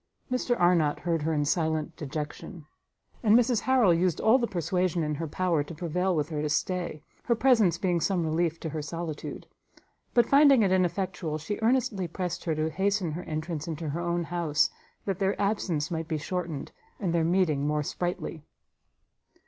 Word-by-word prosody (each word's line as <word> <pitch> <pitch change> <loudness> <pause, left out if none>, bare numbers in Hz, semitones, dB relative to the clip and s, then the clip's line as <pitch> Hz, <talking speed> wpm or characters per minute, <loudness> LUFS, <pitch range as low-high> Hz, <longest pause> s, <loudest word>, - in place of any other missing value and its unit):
Mr 250 -1 0
Arnott 170 -4 +3
heard 170 -2 0
her 160 +2 0
in 145 -2 +1
silent 160 0 0
dejection; 150 +2 -6 0.6
and 220 -1 +6
Mrs 245 -2 +3
Harrel 250 -8 +4
used 175 0 +1
all 230 +4 +5
the 235 - 0
persuasion 180 -1 0
in 150 0 -1
her 160 +2 -3
power 170 -1 0
to 150 +3 -9
prevail 180 +3 0
with 150 0 -1
her 150 -2 -2
to 150 - -1
stay, 170 -1 -2 0.2
her 235 - +2
presence 225 -9 +4
being 175 -2 0
some 180 -3 +1
relief 165 +1 0
to 160 - -3
her 155 0 -4
solitude: 160 0 -5 0.7
but 240 -2 +6
finding 280 -3 +6
it 190 - +2
ineffectual, 180 -3 0
she 160 +7 -4
earnestly 225 -6 +1
pressed 180 +1 -4
her 160 -2 0
to 155 +1 -1
hasten 195 -1 0
her 165 +4 -4
entrance 155 0 -4
into 160 -1 -4
her 165 +4 -3
own 175 0 -1
house, 165 -2 +1 0.3
that 195 -3 -2
their 195 0 0
absence 190 -7 0
might 165 -1 -3
be 160 -2 -1
shortened, 165 -2 -4 0.3
and 180 -5 -1
their 170 -1 +2
meeting 160 -5 +2
more 150 0 0
sprightly. 175 0 -3
170 Hz, 180 wpm, -28 LUFS, 155-190 Hz, 0.7 s, and